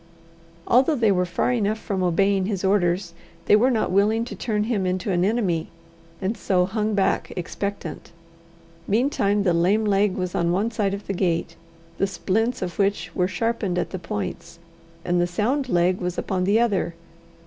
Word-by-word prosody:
Although 260 +6 +4
they 225 -5 +3
were 180 -1 +1
far 175 +7 0
enough 215 -3 0
from 200 -3 -3
obeying 190 +2 +2
his 200 -3 -3
orders, 180 -2 +1 0.3
they - - +6
were 240 +5 +4
not 225 -7 0
willing 215 +4 +2
to - - -7
turn 210 -3 -1
him 210 -4 -1
into 185 +2 -1
an 175 -1 +1
enemy, 190 -6 0 0.5
and 200 +3 -1
so 185 -3 +1
hung 210 +2 -1
back 195 -1 +1
expectant. 200 +3 -5 0.8
Meantime 210 -3 +1
the 180 -3 +2
lame 190 +6 +2
leg 200 -1 +2
was 180 -1 -3
on 170 0 +1
one 205 +6 0
side 205 -3 0
of 200 - -9
the 195 - -3
gate, 175 -3 -1 0.4
the 195 - +2
splints 205 +5 -1
of 175 0 -6
which 195 -4 0
were 180 - +2
sharpened 200 -1 -1
at - - -2
the 185 - -4
points, 105 - -5 0.5
and 175 0 +2
the 175 - +1
sound 250 +10 -1
leg 180 -1 +2
was 180 0 -3
upon 185 -2 -1
the 205 +4 +3
other. 200 -7 0
195 Hz, 180 wpm, -23 LUFS, 180-215 Hz, 0.8 s, they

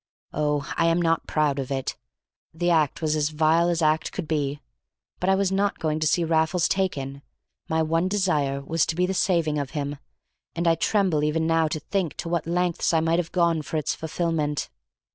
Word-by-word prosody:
Oh, 150 0 -1
I 165 - +3
am 165 +1 +3
not 165 -1 +1
proud 150 -3 +1
of 135 - -4
it; 135 -1 -2 0.6
the 175 +1 +1
act 155 -1 +1
was 155 -1 +1
as 150 -1 +1
vile 160 +2 +3
as 170 -1 0
act 155 0 +1
could 180 -5 -5
be; 145 -2 -1 0.6
but 180 - 0
I 190 - +5
was 195 -1 +1
not 200 +1 +1
going 155 -1 -1
to 155 - +1
see 170 +3 +2
Raffles 165 +2 +2
taken, 140 -8 -2 0.5
my 160 0 +2
one 165 +3 +1
desire 155 -9 0
was 160 +3 0
to 160 - -2
be 180 +1 +2
the 190 - -1
saving 170 -5 +1
of 140 -2 -3
him, 145 0 -3 0.6
and 170 0 -1
I 165 - +6
tremble 180 -4 +1
even 155 +2 +1
now 165 0 +2
to 155 - -3
think 175 0 -2
to 165 - -4
what 170 -1 -1
lengths 175 -1 0
I - - +5
might 165 +1 +1
have 170 -2 -3
gone 170 -3 +2
for 155 - -4
its 150 - -1
fulfilment. 160 -2 -2
160 Hz, 205 wpm, -25 LUFS, 150-175 Hz, 0.6 s, I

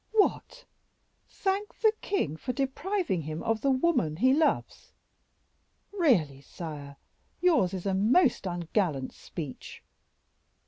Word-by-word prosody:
"What! 445 +3 +1 0.6
thank 395 +1 -2
the 440 -1 +5
king 160 - -1
for 250 +10 -4
depriving 285 - -1
him 155 +1 -5
of 225 -1 0
the 275 - +2
woman 260 - +2
he 255 +10 +4
loves! 310 +2 0 1.0
Really, 205 - +2
sire, 145 -3 -8 0.4
yours 320 - +3
is 190 -1 -5
a 195 - +1
most 225 - +3
ungallant 170 -5 -1
speech." 150 -6 -8
220 Hz, 110 wpm, -28 LUFS, -, 1.0 s, the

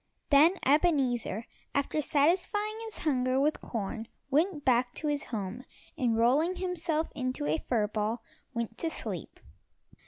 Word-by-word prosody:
Then 310 +6 +7
Ebenezer, 265 - +2 0.3
after 280 +2 +1
satisfying 360 +9 +2
his 440 - -7
hunger 255 -3 +2
with 300 +3 +1
corn, 225 0 -4 0.2
went 305 +1 +1
back 245 -1 +3
to - - -5
his 290 -1 -1
home, 220 +2 -4 0.3
and 245 -7 +1
rolling 285 +10 +3
himself 340 -3 -1
into 255 - -2
a 155 +2 +1
fur 225 -4 +1
ball, 215 +2 -2 0.3
went 235 -2 -4
to 330 - 0
sleep. - - -5
270 Hz, 135 wpm, -30 LUFS, 235-315 Hz, 0.3 s, Then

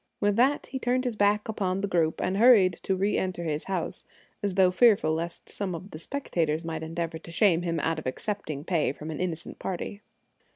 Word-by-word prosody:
With 205 0 +2
that 265 +5 +3
he 265 - -5
turned 255 +1 +1
his 245 -3 -1
back 205 +1 +2
upon 195 -3 -1
the 200 - 0
group 165 -4 +1
and 185 +1 0
hurried 210 -6 +6
to 190 - 0
reenter 185 -2 -1
his 155 -2 -2
house, 185 -4 -3 0.4
as 200 -3 -1
though 185 -2 +5
fearful 200 -6 +4
lest 170 +2 -4
some 190 -4 -3
of 180 +5 -9
the 155 - -8
spectators 165 - -2
might 160 -1 -4
endeavor 165 0 -4
to 165 - -10
shame 175 -1 +4
him 170 -2 -1
out 160 +1 0
of 155 - -6
accepting 155 - -4
pay 160 -5 +1
from 155 +2 -7
an 155 - -5
innocent 170 -2 -4
party. 190 +2 -4
185 Hz, 205 wpm, -27 LUFS, 165-205 Hz, 0.4 s, hurried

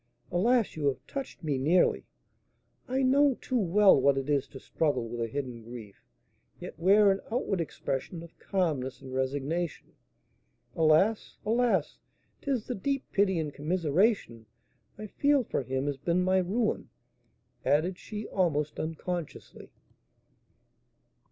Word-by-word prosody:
"Alas! 225 +5 +2
you 150 -2 -1
have 130 -1 -2
touched 275 - -7
me 145 -4 -1
nearly; 165 +7 +2 0.8
I 265 +2 0
know 275 +1 +4
too 255 +1 -2
well 195 -5 +5
what 140 0 +4
it 135 +2 -2
is 140 -2 +1
to 135 - -11
struggle 135 -7 -1
with 120 +1 -5
a 115 - 0
hidden 125 -2 -5
grief, 115 -3 -11 0.6
yet - - -9
wear 200 +3 +5
an 195 - -1
outward 210 -6 0
expression 165 +1 -4
of 170 - -14
calmness 150 -9 -1
and 130 -1 -9
resignation. 140 +5 -2 0.8
Alas! 165 +7 +2
alas! 225 -7 +1 0.4
'tis 265 -6 -1
the 250 - -3
deep 275 +6 -3
pity 195 -2 +2
and 155 -3 -2
commiseration 160 - 0 0.5
I 215 - -7
feel 285 +5 +2
for 205 - -2
him 130 +1 -2
has 145 -2 -2
been 170 +6 0
my 185 +1 +3
ruin," 210 +5 -1 0.7
added 170 +6 +1
she, 215 0 -6
almost 155 -6 0
unconsciously. 165 +1 -5
170 Hz, 135 wpm, -29 LUFS, 140-210 Hz, 0.8 s, well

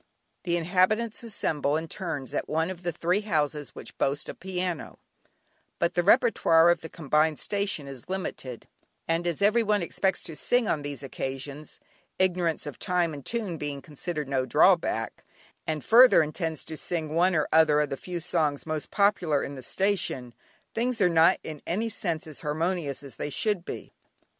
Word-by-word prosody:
The 175 -1 +1
inhabitants 190 +6 +1
assemble 155 -10 -1
in 160 +1 -4
turns 160 -8 -4
at - - -2
one 160 +3 0
of 180 -2 -8
the 175 -1 -1
three 175 +4 0
houses 150 -7 -1
which - - -10
boast 140 +2 0
a - - -4
piano; 180 -3 -4 0.8
but 170 - +1
the 175 - +2
repertoire 170 -5 +5
of 175 - 0
the 160 - -8
combined 155 -1 +1
station 200 -8 -2
is 135 +2 -10
limited, 135 -10 -5 0.4
and 165 +1 0
as 175 +3 -1
every 215 +4 +4
one 210 -4 +1
expects 190 +2 0
to 160 - -7
sing 245 - +1
on 150 - 0
these 145 -1 -6
occasions 135 +2 -6 0.4
(ignorance 180 -4 +1
of 145 - -7
time 175 -3 0
and 140 -2 -9
tune 215 -8 -2
being 145 -1 -4
considered 150 +2 -5
no 135 -1 0
drawback), 130 - +2 0.4
and 155 -4 -2
further, 240 -6 +7
intends 160 0 -3
to 160 - -6
sing 160 -3 -3
one 180 +3 +3
or 155 - +2
other 155 -2 +5
of 150 -1 0
the - - 0
few 175 +4 -5
songs 155 -4 0
most 155 -2 -4
popular 185 -8 +2
in 140 - -5
the 135 - -8
station, 135 - -1 0.4
things 240 +1 -1
are 180 -3 +4
not 165 -1 +5
in 155 -2 -7
any 215 +7 -1
sense 170 -7 -2
as 155 -3 -8
harmonious 155 -1 -2
as 135 -4 -10
they - - -3
should 205 +4 0
be. - - -7
165 Hz, 175 wpm, -27 LUFS, 150-185 Hz, 0.8 s, further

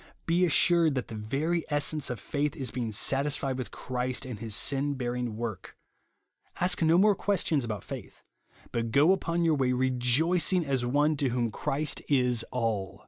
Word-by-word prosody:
Be 175 +2 +3
assured 165 -2 +4
that 130 - -3
the - - -7
very 145 +11 -1
essence 145 0 0
of 125 -3 -4
faith 145 +7 -2
is 130 -4 -3
being 120 -3 -3
satisfied 135 +3 0
with 130 - -4
Christ 125 +1 -3
and 125 -5 -6
his 110 -2 -4
sin 140 +4 +1
bearing 125 -3 -3
work; 115 -3 -6 0.8
ask 180 0 0
no 165 +1 +4
more 205 +3 +5
questions 175 -8 0
about 110 -4 -4
faith - - -9 0.5
,but 115 -1 -2
go 145 +9 +5
upon 170 -3 0
your 165 - +3
way 130 -3 +1
rejoicing, 130 +8 +2
as 135 -3 0
one 145 +5 +2
to 140 -2 0
whom 120 -2 -1
Christ 145 +8 -2
is 125 -4 +2
all. 115 -6 -2
135 Hz, 170 wpm, -28 LUFS, 120-155 Hz, 0.8 s, more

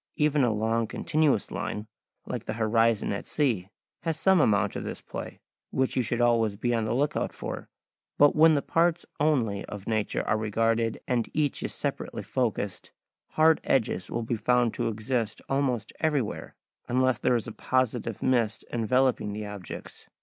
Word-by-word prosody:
Even 150 -2 +2
a 120 - +3
long 110 +1 0
continuous 150 -2 +1
line, 105 0 -4 0.4
like - - -5
the - - -3
horizon 115 -1 +2
at 100 - -5
sea, 115 -11 0 0.3
has 160 -1 -2
some 190 -3 +5
amount 100 -5 +2
of - - -3
this - - -5
play, - - -7 0.3
which 130 -1 0
you 130 - +3
should 120 0 -1
always 115 -3 +3
be 120 +4 -1
on 115 -2 +1
the 110 - -1
look 145 +3 +1
out - - -1
for. - - -6 0.5
But 145 0 +6
when 160 0 +6
the 140 - 0
parts 170 +1 +1
only 125 -10 +1
of 100 -1 -8
nature 110 -2 -1
are 110 - +2
regarded 115 +1 0
and 120 -3 0
each 150 -2 0
is - - -2
separately - - -3
focussed, - - -2 0.4
hard 160 0 +4
edges 115 -8 0
will 115 - -2
be 115 +1 -2
found 120 +1 +2
to - - -1
exist 115 0 -2
almost 130 -6 -1
everywhere, 145 -9 -1 0.3
unless 130 0 +2
there 125 - +2
is 115 - -1
a - - -6
positive 120 -2 -1
mist 120 -4 +1
enveloping 120 -2 +1
the 105 0 -4
objects. 105 -4 -9
120 Hz, 170 wpm, -27 LUFS, 110-135 Hz, 0.5 s, But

